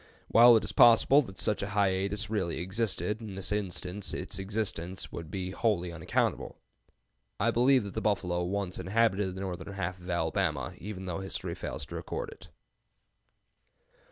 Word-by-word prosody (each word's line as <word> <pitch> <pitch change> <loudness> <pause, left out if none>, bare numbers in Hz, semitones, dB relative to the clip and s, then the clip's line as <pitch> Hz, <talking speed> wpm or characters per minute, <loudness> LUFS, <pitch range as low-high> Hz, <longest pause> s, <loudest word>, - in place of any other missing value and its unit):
While 120 +1 +8
it - - -1
is - - -3
possible 120 +5 +7
that 95 -9 -9
such 105 - +1
a 100 - -3
hiatus 100 +1 +1
really 95 -6 -1
existed, 105 +3 -1
in 105 -4 -7
this 95 +1 -4
instance 95 -1 -2
its - - -5
existence 95 -3 -3
would 85 -2 -7
be 95 0 -4
wholly 95 -4 0
unaccountable. 85 -2 -1 0.8
I 115 +2 +3
believe 125 +1 +4
that 100 - -7
the 110 - -2
buffalo 90 -5 0
once 95 0 -2
inhabited 95 0 +1
the 95 - -6
northern 95 +1 -5
half 90 -1 -3
of 90 +1 -11
Alabama, 80 -4 0
even 95 -1 -6
though 90 0 -3
history 95 0 -3
fails - - -5
to - - -9
record - - -4
it. - - -13
95 Hz, 160 wpm, -30 LUFS, 90-105 Hz, 0.8 s, While